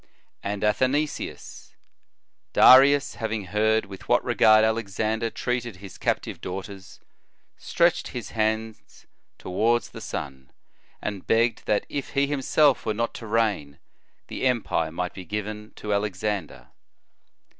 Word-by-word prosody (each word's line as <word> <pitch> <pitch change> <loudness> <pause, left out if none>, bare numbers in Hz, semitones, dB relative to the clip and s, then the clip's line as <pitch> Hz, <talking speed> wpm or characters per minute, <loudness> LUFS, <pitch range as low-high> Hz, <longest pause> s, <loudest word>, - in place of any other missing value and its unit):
"f - - -34 0.3
And 100 +1 -4
Athenaeus: 130 +8 -2 0.8
"Darius, 140 +2 +7
having 110 -3 -3
heard 110 +3 +1
with 95 -2 -12
what - - +3
regard 110 0 +5
Alexander 110 +1 -1
treated 120 -2 -3
his 95 +1 -12
captive - - -2
daughters, 95 +1 -8 0.6
stretched 170 0 +1
his 120 -5 -7
hands 110 0 -3 0.3
toward 115 +6 +1
the - - -11
sun, 65 -2 -6 0.5
and 100 -3 -5
begrsred 115 0 +2
that 105 - +1
if 140 -2 -5
he 140 0 +3
himself 145 0 +2
were 110 - -2
not 115 +2 0
o - - -33
o - - -9
to 115 - -9
reign, 105 -10 0 0.5
the - - -2
empire 110 -10 0
might 90 +2 -3
be 95 - -8
given 105 +3 -5
to 105 -1 -3
Alex 100 -1 -2
ander." 105 -4 -3
110 Hz, 135 wpm, -25 LUFS, 100-120 Hz, 0.8 s, Darius